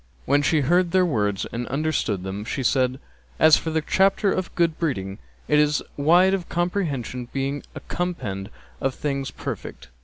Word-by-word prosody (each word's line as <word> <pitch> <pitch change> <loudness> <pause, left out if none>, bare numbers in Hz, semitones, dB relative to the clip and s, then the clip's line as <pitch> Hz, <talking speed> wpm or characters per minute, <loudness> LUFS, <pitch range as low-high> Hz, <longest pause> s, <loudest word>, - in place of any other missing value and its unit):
When 145 +2 +3
she 150 +2 +2
heard 175 +6 +3
their 185 +1 +3
words 105 - 0
and 120 +1 -4
understood 135 -9 -1
them 95 +2 -4
she 130 +4 -3
said, 130 +1 +1 0.4
"As 155 -1 +8
for 160 - -3
the 160 0 0
chapter 195 +3 +3
of 185 -1 -3
good 170 -2 +1
breeding, 100 - -2 0.3
it 150 - +4
is 150 0 +2
wide 175 +6 +4
of 185 -4 -2
comprehension, 145 - -2
being 135 +1 -2
a - - -6
compend 120 - -4 0.3
of 135 -1 -1
things 140 -2 -2
perfect. - - -7
145 Hz, 165 wpm, -24 LUFS, 125-170 Hz, 0.4 s, As